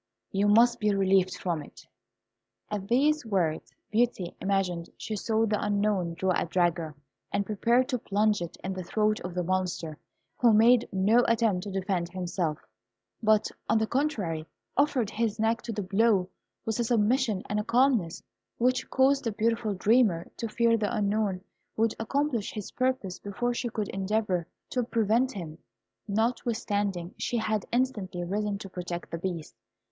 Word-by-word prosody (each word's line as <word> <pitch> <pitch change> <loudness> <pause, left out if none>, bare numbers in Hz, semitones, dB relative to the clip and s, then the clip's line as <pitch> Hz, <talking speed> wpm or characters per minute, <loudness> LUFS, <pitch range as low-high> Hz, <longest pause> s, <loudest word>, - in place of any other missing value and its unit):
You 200 +1 +2
must 235 +3 +5
be 210 -1 +2
relieved 190 -1 +2
from 170 -4 -2
it!" - - -14 0.9
At 200 -2 -3
these 290 +6 +3
words 180 -8 -1 0.2
Beauty 215 -5 0
imagined 185 -3 -1
she 220 - -4
saw 220 +2 +1
the 210 -1 0
Unknown 205 -4 0
draw 190 +2 0
a - - 0
dagger, 170 -3 0 0.4
and 200 - 0
prepare 235 +5 +2
to 255 -1 -2
plunge 210 -1 +1
it 170 - -6
in 190 - -2
the 185 - -5
throat 215 +4 +1
of 180 0 -7
the 180 - 0
Monster, 175 -3 -2 0.4
who 235 -3 +5
made 230 +2 +5
no 210 +5 +4
attempt 225 -5 +2
to 200 - -5
defend 185 -2 -1
himself, 175 -3 -2 0.6
but, 215 -1 +3 0.2
on 225 - +4
the 220 - +2
contrary, 210 - -1 0.3
offered 265 -6 +2
his 220 -1 -1
neck 225 +2 +1
to 235 - -5
the 210 -2 -3
blow 195 -1 +2 0.4
with 225 +1 -2
a - - +3
submission 225 -2 +2
and 210 - -1
a - - -1
calmness 235 -8 +2 0.3
which 255 +2 +1
caused 270 +1 +3
the 230 - 0
beautiful 225 0 0
dreamer 205 -4 +2
to 230 - -3
fear 230 +1 +2
the 210 +1 0
Unknown 205 -2 0 0.4
would 225 0 +2
accomplish 255 -1 -1
his 210 -3 -6
purpose 255 -8 -1
before 240 +5 -2
she 240 0 -2
could 215 -3 -3
endeavour 195 -3 -1 0.2
to 250 - +1
prevent 230 +3 +1
him, 165 -6 -7 0.5
notwithstanding 205 -4 -1
she 240 - -1
had 215 -2 -1
instantly 215 -8 -1
risen 205 +3 -1
to 200 - -8
protect 180 -2 -6
the 165 - -3
Beast. 170 -3 -4
210 Hz, 160 wpm, -28 LUFS, 185-230 Hz, 0.9 s, must